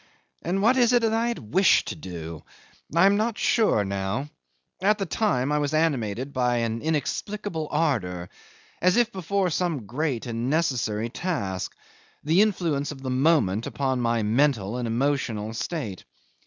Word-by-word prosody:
And 190 +3 -1
what 245 +4 +4
is 245 -1 +4
it 240 -1 +4
that 220 -1 +2
I 230 +1 +1
had 125 - -5
wished 190 +1 +4
to - - -4
do? 85 - -7 0.5
I 170 +3 +6
am 200 +1 +5
not 220 +1 0
sure 205 - +2
now. 100 +9 -3 0.5
At 205 +2 +3
the 195 - -2
time 155 - 0
I 150 - +2
was 145 +1 -1
animated 135 -5 0
by 125 -1 +1
an 115 -1 -1
inexplicable 160 +2 -2
ardour, 90 - -1 0.5
as 185 +3 +4
if 240 -1 +3
before 190 -1 -1
some 160 - -1
great 130 +2 -2
and 120 +1 -2
necessary 120 -8 0
task 110 - -3 0.5
the 160 +6 +4
influence 170 -9 0
of 135 -2 -10
the 130 - -2
moment 130 - +2
upon 130 -2 -1
my 115 -1 +1
mental 115 -1 +1
and 120 -1 -2
emotional 115 -3 -1
state. 115 - -4
140 Hz, 160 wpm, -25 LUFS, 115-180 Hz, 0.5 s, I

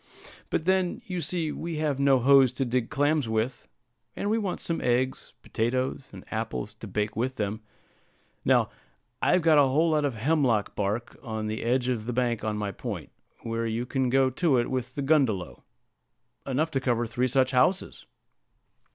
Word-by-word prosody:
"But 155 - -1
then, 185 -1 +1
you 180 -2 -3
see, 165 -3 -1
we 165 +1 -5
have 150 -3 -1
no 140 -1 +5
hoes 135 0 +6
to 135 +1 -1
dig 120 -1 -1
clams 145 -3 +1
with; 110 +3 -2 0.5
and 205 - -2
we 225 - +2
want 200 -4 -3
some 165 - -1
eggs, 125 +2 0
potatoes, 130 +4 -2
and - - -11
apples 110 -1 -3
to 110 +1 -10
bake 105 +2 -2
with 130 +4 -1
them. 105 0 -3 0.8
Now, - - +3 0.5
I've 180 - +3
got 160 -2 +6
a 140 - +5
whole 155 +5 +2
lot 155 -1 +2
of 140 -4 -1
hemlock 120 -3 +1
bark 105 +4 -2
on 110 -2 -4
the 110 +1 -3
edge 125 +2 +1
of 115 -3 -2
the 125 - -2
bank 120 -3 0
on 110 -1 -1
my 105 -1 -2
point, - - -6 0.3
where 115 0 -2
you 115 +2 -2
can 130 0 0
go 130 +1 +3
to 140 0 +2
it 120 +1 0
with 130 -1 -3
the 140 - -2
gundelow 130 - +1 0.9
enough 150 +5 0
to 135 - 0
cover 120 -2 +1
three 120 +2 0
such 130 +1 +2
houses. 140 +9 +1
130 Hz, 180 wpm, -27 LUFS, 115-145 Hz, 0.9 s, hoes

